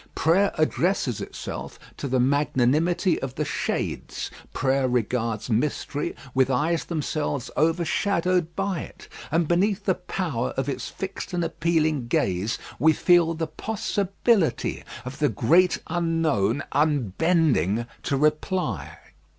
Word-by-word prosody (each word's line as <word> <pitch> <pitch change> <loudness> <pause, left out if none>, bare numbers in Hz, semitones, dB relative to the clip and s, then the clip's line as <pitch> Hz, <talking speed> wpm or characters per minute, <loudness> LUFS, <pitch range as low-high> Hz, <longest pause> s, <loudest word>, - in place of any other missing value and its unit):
Prayer 190 +5 +3
addresses 155 - +1
itself - - -6 0.2
to - - -4
the 130 -1 +1
magnanimity 145 +6 +2
of 135 -1 -4
the 150 - -1
Shades; - - -3 0.2
prayer 135 0 +1
regards 115 -2 -1
mystery 140 +4 -1 0.2
with 130 0 +3
eyes 155 +6 +1
themselves 150 -4 -2
overshadowed 170 +1 +1
by 195 -3 -1
it, - - -10 0.2
and 165 0 +1
beneath 195 +4 +1
the 190 - +3
power 175 -9 -3
of 135 0 0
its 140 - -3
fixed 190 0 -6
and 175 - 0
appealing 160 -5 0
gaze, 100 -1 0 0.2
we 160 +4 +5
feel 170 0 +4
the 160 0 -1
possibility 200 +1 0 0.2
of 130 +2 -7
the 150 -1 +3
great 165 - +3
Unknown 160 - +1
unbending 145 - +2 0.2
to 140 - -1
reply. 155 - 0
155 Hz, 120 wpm, -25 LUFS, 130-175 Hz, 0.2 s, we